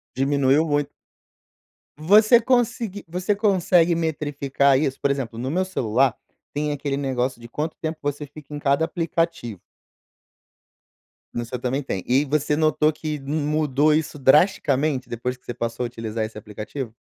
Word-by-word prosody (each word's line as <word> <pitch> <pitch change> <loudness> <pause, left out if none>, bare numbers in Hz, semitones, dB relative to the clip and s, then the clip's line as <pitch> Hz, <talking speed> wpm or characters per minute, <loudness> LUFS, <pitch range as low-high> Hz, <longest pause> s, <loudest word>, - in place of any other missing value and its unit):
Diminuiu 140 +2 +2
muito. 145 -2 0 1.1
Você 210 +9 +6
consegui 235 -4 0
você 180 +4 -1
consegue 180 -4 +3
metrificar 145 -4 +1
isso? 135 -3 -1
Por 140 - +1
exemplo, 125 -5 -4
no 130 +3 -3
meu 185 +4 +1
celular 130 -7 +1 0.4
tem 150 +1 -1
aquele 140 -1 -2
negócio 130 -3 -2
de 120 - -11
quanto 155 +5 -3
tempo 160 0 -3
você 145 +1 -3
fica 145 0 -13
em 145 - -4
cada 140 +2 +2
aplicativo. 165 - -2 1.7
No 120 - -3
seu 125 +2 -5
também 130 +3 -2
tem 95 -9 -4
e 135 +4 +2
você 150 +1 0
notou 155 -1 +3
que 155 0 -4
mudou 150 0 +1
isso 150 -1 -1
drasticamente 140 -2 +3
depois 125 +2 -4
que - - -37
você 120 - -5
passou 115 +1 -3
a - - -1
utilizar 115 -2 -4
esse 110 0 -9
aplicativo? 105 +4 -7
145 Hz, 150 wpm, -23 LUFS, 130-160 Hz, 1.7 s, Você